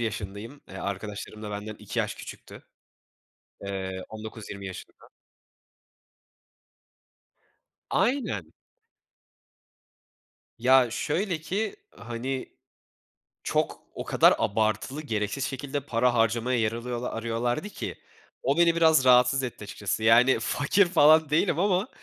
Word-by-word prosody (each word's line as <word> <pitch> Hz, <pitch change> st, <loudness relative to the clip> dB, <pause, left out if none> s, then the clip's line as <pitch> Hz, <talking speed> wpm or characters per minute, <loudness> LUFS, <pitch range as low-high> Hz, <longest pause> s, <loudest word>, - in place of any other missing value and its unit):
yaşındayım. 110 Hz, +4 st, -5 dB
Eee, -, -, -11 dB
arkadaşlarım 105 Hz, +2 st, -5 dB
da 105 Hz, -, -5 dB
benden 105 Hz, +1 st, -5 dB
2 -, -, -6 dB
yaş -, -, 0 dB
küçüktü. -, -, -11 dB, 1.0 s
Eee, 95 Hz, -1 st, -4 dB
19-20 110 Hz, -2 st, -8 dB
yaşında. 95 Hz, -, -11 dB, 2.8 s
Aynen. 215 Hz, -, 0 dB, 2.0 s
Ya, 125 Hz, +1 st, +5 dB
şöyle 170 Hz, -, -1 dB
ki, 200 Hz, -, -2 dB, 0.2 s
hani, 120 Hz, +3 st, -4 dB, 0.9 s
çok, -, -, -1 dB
o -, -, -5 dB
kadar -, -, +5 dB
abartılı, 110 Hz, +7 st, 0 dB
gereksiz 110 Hz, 0 st, -2 dB
şekilde 140 Hz, +1 st, -3 dB
para 125 Hz, -2 st, +1 dB
harcamaya 115 Hz, +2 st, +1 dB
yer 110 Hz, -1 st, +1 dB
alıyola 120 Hz, +1 st, -4 dB
arıyorlardı 120 Hz, -, -2 dB
ki, -, -, -6 dB, 0.5 s
o 140 Hz, +3 st, +1 dB
beni 170 Hz, -1 st, +5 dB
biraz 160 Hz, -5 st, +5 dB
rahatsız 125 Hz, +1 st, +5 dB
etti 120 Hz, -4 st, -5 dB
açıkçası. 105 Hz, +1 st, -3 dB
Yani, 120 Hz, +4 st, +5 dB
fakir 180 Hz, +7 st, +2 dB
falan 155 Hz, -2 st, +5 dB
değilim 160 Hz, +1 st, +2 dB
ama, 190 Hz, +1 st, +2 dB
120 Hz, 105 wpm, -27 LUFS, 110-145 Hz, 2.8 s, Ya